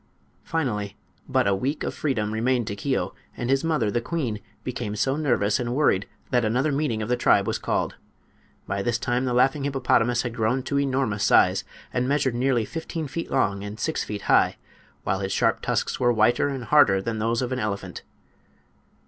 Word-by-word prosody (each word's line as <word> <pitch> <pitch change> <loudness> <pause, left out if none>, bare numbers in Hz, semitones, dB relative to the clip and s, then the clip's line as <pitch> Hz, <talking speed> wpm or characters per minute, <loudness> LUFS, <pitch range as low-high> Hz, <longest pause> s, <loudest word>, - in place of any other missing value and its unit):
Finally 105 -11 -2 0.3
but - - +2
a 100 - +3
week 135 +10 -2
of - - -2
freedom 110 -8 -1
remained 120 +2 +1
to 100 - -4
Keo, 130 +6 -1 0.2
and 120 +1 -1
his 135 +2 +2
mother, 150 -10 +1
the 120 - 0
queen, 125 -7 -2 0.2
became 120 -4 -4
so 135 +6 +1
nervous 120 -8 +1
and 120 0 -2
worried 120 -9 +2 0.2
that 125 -1 +3
another 125 +7 +1
meeting 140 -6 -1
of - - -4
the 125 - +3
tribe 120 - +3
was - - -1
called. - - -1 0.7
By 100 - -2
this 120 +3 0
time 125 +1 -1
the 125 - 0
laughing 135 +3 +3
hippopotamus 125 -3 +2
had 120 -2 -4
grown 120 +3 0
to 140 +2 0
enormous 130 -7 0
size, - - +4 0.3
and 125 +1 0
measured 140 -3 +1
nearly 120 -2 +1
fifteen 160 +2 -5
feet 165 +5 -5
long 100 -7 +1
and 105 +1 -7
six - - -1
feet 105 -1 -6
high, - - +3 0.5
while 95 - 0
his 95 -1 -3
sharp - - +1
tusks - - -1
were 120 -1 +3
whiter 120 +4 +3
and 135 -3 -4
harder 115 -8 +5
than 110 +3 -3
those 115 +3 0
of 125 - -3
an 130 - -1
elephant. 100 -5 -4
120 Hz, 190 wpm, -25 LUFS, 110-135 Hz, 0.7 s, harder